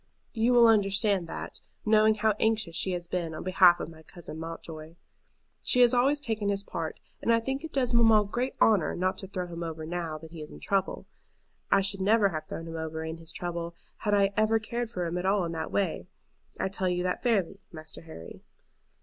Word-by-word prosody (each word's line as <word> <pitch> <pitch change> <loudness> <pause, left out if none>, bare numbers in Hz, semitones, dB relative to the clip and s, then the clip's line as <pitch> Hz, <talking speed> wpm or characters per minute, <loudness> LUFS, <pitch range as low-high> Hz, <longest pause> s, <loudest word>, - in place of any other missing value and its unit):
You 235 +1 +2
will 240 -1 +7
understand 200 -4 +3
that, - - -6 0.2
knowing 215 0 +5
how 220 +1 +2
anxious 220 -6 +1
she 185 +1 +1
has 175 -1 -4
been 170 -2 -3
on - - -6
behalf 185 -1 +5
of - - -4
my 160 -1 -13
cousin 160 0 -10
Mountjoy. 165 -1 -8 0.7
She 250 - +3
has 245 0 +6
always 270 +4 +3
taken 220 -7 -2
his 200 0 0
part, 160 -5 -5 0.2
and - - +1
I 230 - +5
think 265 +5 -3
it 320 - -6
does 250 -3 0
mamma 225 -3 +5
great 245 +6 -2
honor 210 -7 +3
not 185 +1 -1
to 190 - -6
throw 185 -2 -4
him 170 -1 -7
over 160 -1 -5
now 165 -1 -3
that 160 +1 -12
he 165 -2 -8
is 150 - -8
in - - -11
trouble. 195 -1 -1 0.6
I - - +4
should 195 0 0
never 205 +1 +4
have 155 -3 -5
thrown 165 - -6
him 165 0 -6
over 160 0 -4
in 160 +1 -5
his 165 0 -7
trouble, 170 -1 -4 0.2
had 210 -1 +1
I 200 0 +3
ever 215 +1 +3
cared 235 +2 -3
for 180 -6 -3
him 170 +1 -2
in 190 -2 +1
that 160 -1 -4
way. 190 -3 -1 0.5
I - - +1
tell 190 -1 -1
you 180 0 -1
that 180 0 -1
fairly, 200 -6 0
Master 155 -1 -8
Harry. 160 - -11
190 Hz, 210 wpm, -28 LUFS, 165-220 Hz, 0.7 s, will